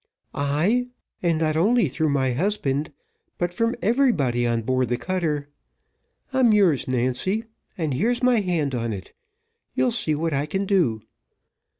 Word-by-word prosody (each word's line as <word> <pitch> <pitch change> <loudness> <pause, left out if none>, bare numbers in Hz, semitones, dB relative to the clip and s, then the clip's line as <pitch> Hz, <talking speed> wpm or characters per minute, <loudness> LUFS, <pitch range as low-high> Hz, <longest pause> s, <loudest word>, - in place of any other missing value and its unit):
"Ay, 160 +13 +1 0.3
and 170 -3 +1
not 155 -1 0
only 210 +5 +3
through 155 +4 -1
my 135 -2 +1
husband, 150 -2 -1 0.5
but 175 0 -1
from 230 +5 0
everybody 165 - +2
on 115 -1 0
board 130 0 0
the 120 - 0
cutter. 155 -3 -2 0.9
I'm 260 -3 +4
yours, 185 -10 +3
Nancy 130 - 0 0.3
and 155 -5 -1
here's 240 - 0
my 250 -2 +4
hand 170 -8 -1
on 115 -2 -2
it 95 -2 -9 0.6
you'll 250 - +2
see 190 -9 0
what 160 +1 -1
I 140 +2 0
can 195 +5 -2
do. 155 - +1
155 Hz, 150 wpm, -24 LUFS, 130-205 Hz, 0.9 s, I'm